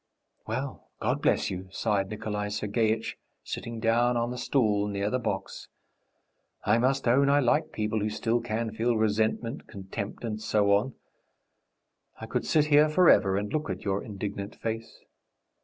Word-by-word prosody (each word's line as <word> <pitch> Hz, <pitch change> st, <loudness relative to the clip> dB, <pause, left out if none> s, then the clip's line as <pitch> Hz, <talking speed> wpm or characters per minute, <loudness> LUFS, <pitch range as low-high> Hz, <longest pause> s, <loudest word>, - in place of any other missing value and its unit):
"Well, -, -, -4 dB
God -, -, 0 dB
bless -, -, +2 dB
you!" 95 Hz, 0 st, -5 dB
sighed 100 Hz, -1 st, 0 dB
Nikolay 105 Hz, -1 st, -3 dB
Sergeitch, 110 Hz, +2 st, -1 dB, 0.2 s
sitting 115 Hz, -1 st, -5 dB
down 120 Hz, +2 st, +2 dB
on 120 Hz, +1 st, 0 dB
the 125 Hz, -, -5 dB
stool 105 Hz, -6 st, +1 dB
near 100 Hz, 0 st, -1 dB
the 130 Hz, -, +1 dB
box. 95 Hz, -5 st, -4 dB, 1.0 s
"I 110 Hz, +3 st, +3 dB
must 130 Hz, +2 st, +1 dB
own 140 Hz, +4 st, +4 dB
I 145 Hz, +1 st, +5 dB
like 150 Hz, +4 st, +2 dB
people 110 Hz, 0 st, -1 dB
who 105 Hz, +1 st, 0 dB
still 115 Hz, +2 st, 0 dB
can 115 Hz, -1 st, -2 dB
feel 115 Hz, +1 st, +1 dB
resentment, 110 Hz, +2 st, 0 dB
contempt, 100 Hz, +2 st, -6 dB
and 110 Hz, -2 st, -3 dB
so 105 Hz, -2 st, +2 dB
on. 105 Hz, +5 st, +2 dB, 1.2 s
I -, -, -6 dB
could -, -, -2 dB
sit 150 Hz, -2 st, +4 dB
here 150 Hz, 0 st, +5 dB
forever 150 Hz, -, +5 dB
and 105 Hz, +1 st, -3 dB
look 155 Hz, 0 st, -1 dB
at -, -, -5 dB
your 100 Hz, 0 st, 0 dB
indignant 100 Hz, 0 st, -5 dB
face.... 115 Hz, 0 st, -5 dB
110 Hz, 155 wpm, -28 LUFS, 105-120 Hz, 1.2 s, I